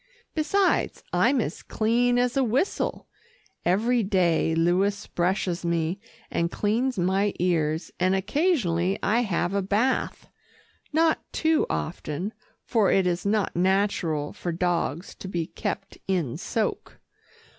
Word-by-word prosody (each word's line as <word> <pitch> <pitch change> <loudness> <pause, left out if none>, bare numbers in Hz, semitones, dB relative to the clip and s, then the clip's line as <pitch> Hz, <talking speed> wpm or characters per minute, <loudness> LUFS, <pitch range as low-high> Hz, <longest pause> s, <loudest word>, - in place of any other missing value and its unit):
Besides, 370 +5 +1
I'm 275 - +3
as 170 -8 -3
clean 240 +3 +1
as 245 +1 +1
a 270 - +3
whistle. 255 - -1 0.6
Every 230 +7 +2
day 180 -5 +2
Louis 190 +5 +1
brushes 180 0 -1
me, 170 +2 0 0.3
and 170 0 0
cleans 230 +6 0
my 190 +3 +1
ears, 165 -2 0
and 185 +1 +3
occasionally 195 - +1
I 225 +3 +3
have 195 -5 0
a 200 - +1
bath. 210 +7 0 0.6
Not 320 +1 +3
too 320 -1 +2
often, 170 +5 -3 0.3
for 220 -5 +2
it 190 - +3
is 180 +2 0
not 210 -1 +1
natural 180 -5 +1
for 175 - -4
dogs 170 -1 -1
to - - -9
be 175 -3 -2
kept 195 +4 -5
in 175 -10 0
soak. - - -3
195 Hz, 125 wpm, -26 LUFS, 175-230 Hz, 0.6 s, I'm